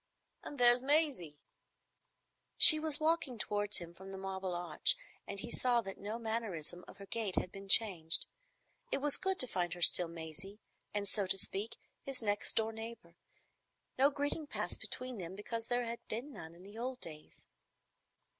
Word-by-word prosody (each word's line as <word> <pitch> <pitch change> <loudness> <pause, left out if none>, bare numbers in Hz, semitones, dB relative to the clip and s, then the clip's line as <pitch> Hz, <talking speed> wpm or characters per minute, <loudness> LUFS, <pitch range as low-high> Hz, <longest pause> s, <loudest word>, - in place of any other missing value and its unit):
And 290 - -8
there's 245 0 +6
Maisie." 270 - 0 1.2
She 310 - +10
was 310 -2 +3
walking 310 -5 0
towards 205 -1 +1
him 170 -2 -4
from 190 +2 -12
the 195 - -8
Marble 190 -1 -5
Arch, 175 -2 +4 0.3
and 200 - -5
he 235 - -7
saw 245 -1 +1
that 195 -3 -9
no 210 +3 -6
mannerism 220 -7 -4
of - - -14
her 200 - -11
gait 210 -2 -4
had 180 - -2
been 195 0 -12
changed. 175 -7 +5 0.7
It - - 0
was 285 +1 -1
good 380 0 -1
to 255 - +3
find 175 -5 -3
her 175 - -12
still 175 - +7
Maisie, 170 +5 -9 0.3
and, 205 -1 -4
so 200 -1 -1
to 195 - +3
speak, 200 +3 -4 0.2
his 275 -1 -3
next 205 -1 -1
door 225 0 -1
neighbour. 225 -6 -10 0.8
No 275 +2 +5
greeting 290 +2 -4
passed - - -5
between 255 -3 -4
them, 180 +1 -7
because 225 +3 -5
there 245 0 -1
had 235 0 -6
been 250 +7 -7
none 160 -5 -11
in 175 - -16
the 205 +3 -12
old 255 +1 -5
days. 155 -2 -10
210 Hz, 175 wpm, -33 LUFS, 185-245 Hz, 1.2 s, She